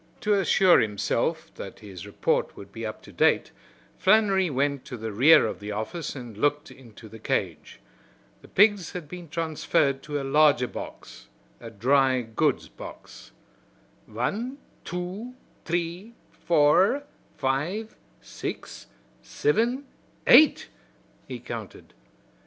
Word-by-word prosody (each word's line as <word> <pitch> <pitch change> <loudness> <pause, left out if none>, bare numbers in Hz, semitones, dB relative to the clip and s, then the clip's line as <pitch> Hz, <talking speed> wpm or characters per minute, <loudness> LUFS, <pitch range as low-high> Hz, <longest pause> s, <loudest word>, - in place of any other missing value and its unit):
To 210 - +2
assure 190 -2 +5
himself 105 -3 -1
that - - -8
his 100 -2 -10
report 100 - -1
would 100 0 -11
be 115 +1 -5
up 110 - -8
to - - -13
date, - - +2 0.5
Flannery 195 -1 +4
went 140 0 -1
to 125 - -7
the 110 0 -5
rear 130 +10 +6
of 110 - -4
the 105 +1 -6
office 110 +12 -4
and 120 -5 -8
looked 145 +6 0
into 115 -3 -14
the 110 +1 -12
cage. - - -3 0.6
The - - -16
pigs 205 -4 +3
had 175 -4 -6
been 175 0 -9
transferred 155 -4 0
to 145 0 -4
a - - -4
larger 140 -2 +4
box - - -10 0.3
a 115 - -9
dry 130 +4 +2
goods 115 -1 0
box. - - -12 0.8
"Wan, 210 - -3 0.3
two, 185 +8 -6 0.3
t'ree, 175 +6 -3 0.2
four, 170 - +3 0.3
five, 150 +11 -2 0.3
six, - - -7 0.3
sivin, 260 - 0 0.4
eight!" 310 - +6 0.6
he - - -6
counted. - - -9
145 Hz, 125 wpm, -26 LUFS, 120-190 Hz, 0.8 s, rear